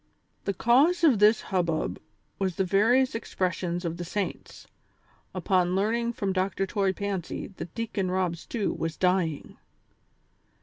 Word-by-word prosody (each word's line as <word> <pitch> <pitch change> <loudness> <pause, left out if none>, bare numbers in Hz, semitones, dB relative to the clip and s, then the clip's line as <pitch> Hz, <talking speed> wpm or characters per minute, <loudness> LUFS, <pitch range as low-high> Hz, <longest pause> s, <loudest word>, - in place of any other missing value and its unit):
The 200 - 0
cause 280 - +4
of 270 -10 +5
this 210 +2 +5
hubbub 170 - -1 0.4
was 190 -3 -1
the 190 - +1
various 225 +8 +3
expressions 180 -5 -2
of 170 0 -3
the 175 - -4
saints, 195 +3 -5 0.7
upon 180 -2 +1
learning 235 +4 0
from 195 -4 -2
Dr. 190 +1 0
Toy 195 0 0
Pancy 195 -3 -4
that 165 0 -8
Deacon 225 -5 -2
Rob 185 -2 0
Stew 205 +5 -3
was 165 -1 -4
dying. 180 -5 0
190 Hz, 135 wpm, -27 LUFS, 175-215 Hz, 0.7 s, of